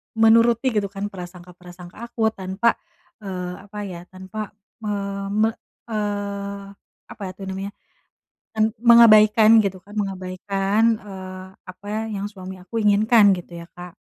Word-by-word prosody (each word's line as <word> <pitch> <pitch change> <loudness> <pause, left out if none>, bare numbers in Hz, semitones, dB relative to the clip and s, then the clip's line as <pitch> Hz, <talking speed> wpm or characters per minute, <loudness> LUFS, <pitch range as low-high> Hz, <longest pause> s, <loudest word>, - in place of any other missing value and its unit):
menuruti 230 +3 +4
gitu 210 -3 0
kan 200 +1 -5
prasangka-prasangka 180 -1 -11
aku 220 -2 0
tanpa, 195 +3 0 0.5
eee, 185 -3 -5 0.2
apa 210 +1 -11
ya 180 -3 -8
tanpa 190 +3 -7 0.4
me 210 - -2 0.4
me 215 +2 +2 0.4
eee, 200 -1 -4 0.4
apa - - -12
ya - - -6
tuh 195 - -10
namanya 195 +1 -5 0.9
en 215 - +5 0.2
mengabaikan 220 -2 +7
gitu 190 -2 -3
kan 205 +3 -15
mengabaikan, 195 +1 -1 0.2
eee, 185 -2 -9 0.2
apa 185 +2 -13
ya 220 - -1 0.2
yang 200 - -3
suami 190 -2 -9
aku 180 +5 -12
inginkan 210 +1 +5
gitu 175 -1 -10
ya - - -15
Kak. 180 0 -11
200 Hz, 135 wpm, -22 LUFS, 185-215 Hz, 0.9 s, mengabaikan